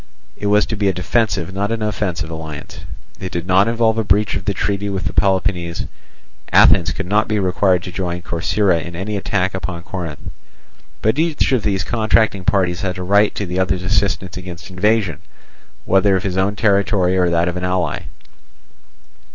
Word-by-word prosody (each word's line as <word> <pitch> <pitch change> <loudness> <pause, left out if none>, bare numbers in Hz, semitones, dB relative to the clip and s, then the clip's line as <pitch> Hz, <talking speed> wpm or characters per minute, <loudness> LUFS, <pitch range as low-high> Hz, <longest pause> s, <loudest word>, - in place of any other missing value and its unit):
It 105 - -4
was 105 0 +4
to 110 - -4
be 100 -1 0
a 95 - +2
defensive, 95 -1 0
not 100 +2 -1
an 115 -1 -2
offensive 90 -6 -2
alliance. 80 -3 -7 0.4
It 95 - -5
did 85 -1 -3
not 95 +3 +4
involve 115 -1 +2
a - - +1
breach 105 +1 +2
of 95 0 -4
the 100 - 0
treaty 100 +1 -1
with 95 -1 -3
Peloponnese: 90 -3 0 0.7
Athens 90 -4 +6
could 95 - -4
not 105 +4 +1
be 110 - 0
required 95 -1 +2
to 90 - -6
join 90 -1 -3
Corcyra 85 +1 +1
in 85 0 -8
any 100 +4 -3
attack 95 -1 -1
upon 90 -2 -5
Corinth. 85 -5 -6 0.7
But 110 +7 +2
each 160 -4 +1
of 130 -4 +2
the 100 -2 0
contracting 110 0 +1
parties 90 -3 +1
had 95 -1 -2
a 90 - -4
right 100 +3 +3
to 100 - -2
the 90 +1 -3
other's 95 -1 0
assistance 95 -2 0
against 90 0 -9
invasion, 95 -3 +1 0.7
whether 95 +1 +3
of 95 - -1
his 95 -3 -2
own 95 +2 +1
territory 100 -3 +2
or 90 -1 +2
that 85 0 +1
of 90 - -2
an 90 - -4
ally. 90 -4 -1
95 Hz, 185 wpm, -19 LUFS, 90-105 Hz, 0.7 s, Athens